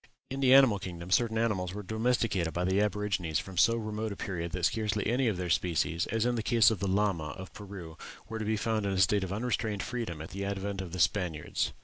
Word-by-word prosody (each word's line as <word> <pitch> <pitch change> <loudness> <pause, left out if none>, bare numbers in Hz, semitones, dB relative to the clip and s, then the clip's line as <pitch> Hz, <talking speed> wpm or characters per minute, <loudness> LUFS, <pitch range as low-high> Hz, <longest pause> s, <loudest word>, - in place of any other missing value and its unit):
In 135 - -3
the 130 -2 +4
animal 130 -7 +6
kingdom 90 -2 -7
certain 115 +1 +2
animals 100 -5 0
were 105 - -5
domesticated 110 -5 0
by 90 - 0
the 95 +2 +2
aborigines 105 -6 0
from 95 - -5
so 115 +6 +5
remote 110 0 -3
a - - -4
period 85 -4 -4
that 90 -1 0
scarcely 105 -1 0
any 125 +3 +2
of 105 -5 0
their 90 -1 -2
species, 85 0 +1
as 115 0 0
in 125 - +2
the 115 - -1
case 115 0 +5
of 110 - -2
the 100 - -1
lama 95 -6 0
of 95 -1 -9
Peru, 95 -6 -9 0.3
were 110 0 -5
to - - -2
be 110 +1 0
found 110 -1 0
in 100 - 0
a - - -1
state 95 +2 +3
of 95 - -4
unrestrained 110 -1 -1
freedom 115 -10 -4
at 80 - -8
the 100 +1 -4
advent 100 0 -3
of 90 -3 -7
the 90 - -5
Spaniards." 85 -4 0
100 Hz, 240 wpm, -30 LUFS, 90-110 Hz, 0.3 s, animal